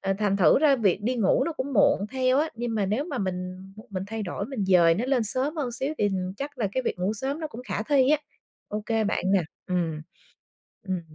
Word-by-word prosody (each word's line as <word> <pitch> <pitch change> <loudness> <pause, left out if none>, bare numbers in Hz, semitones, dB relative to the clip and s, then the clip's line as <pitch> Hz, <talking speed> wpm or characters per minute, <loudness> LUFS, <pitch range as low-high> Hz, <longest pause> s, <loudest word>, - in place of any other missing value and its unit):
ờ, 195 0 0
thành 205 -2 +1
thử 175 -6 +5
ra 285 -2 +4
việc 205 -8 +2
đi 250 +4 0
ngủ 210 -5 +3
nó 335 - -2
cũng 280 -1 -4
muộn 200 -3 +3
theo 260 0 +2
á, 310 +2 +2
nhưng 235 -1 -3
mà 205 -3 +1
nếu 215 +9 0
mà 295 -6 -4
mình 185 -1 -3 0.3
mình 185 -2 -3
thay 220 +1 -4
đổi, 200 +1 -4
mình 250 -7 -3
dời 175 -3 +5
nó 215 +8 -1
lên 260 -2 +2
sớm 260 +9 -1
hơn 265 -6 -2
xíu 270 +5 -2
thì 205 - +3 0.3
chắc 280 +2 -6
là 220 - +1
cái 260 - 0
việc 235 - -2
ngủ 185 +3 0
sớm 270 +7 -3
nó 315 - -2
cũng 245 -4 -9
khả 210 - -1
thi 270 +3 +3
á. 305 - +4 0.5
OK 215 +1 -1
bạn 205 - -1
nè, 195 -3 +4 0.3
ừm, 170 -4 -1 0.9
ừm. 185 -1 -1
225 Hz, 235 wpm, -26 LUFS, 195-265 Hz, 0.9 s, thử